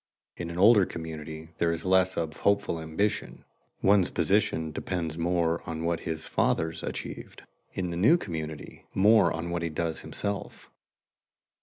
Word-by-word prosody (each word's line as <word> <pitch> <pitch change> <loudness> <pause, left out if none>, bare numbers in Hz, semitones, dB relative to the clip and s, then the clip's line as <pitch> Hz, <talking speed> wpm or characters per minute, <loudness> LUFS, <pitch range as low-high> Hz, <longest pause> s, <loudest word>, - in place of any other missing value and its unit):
In 85 -1 -5
an 85 - -6
older 100 0 +6
community 80 -1 -7
there 85 -1 +2
is 85 +1 -4
less 95 0 +3
of 80 -2 -2
hopeful 100 -5 +1
ambition; 80 +7 -2 0.4
one's 100 -2 +5
position 85 -3 +1
depends 80 0 -3
more 85 0 +1
on 80 0 -4
what 85 -1 0
his 80 -1 -4
fathers 80 0 0
achieved; - - -6 0.3
in 90 -2 -2
the 85 - -4
new 115 - +5
community, 80 - -7
more 100 -3 +5
on 85 +1 -4
what 85 0 -1
he 85 - -1
does 80 +1 -2
himself. 100 -1 -5
85 Hz, 150 wpm, -28 LUFS, 80-95 Hz, 0.4 s, older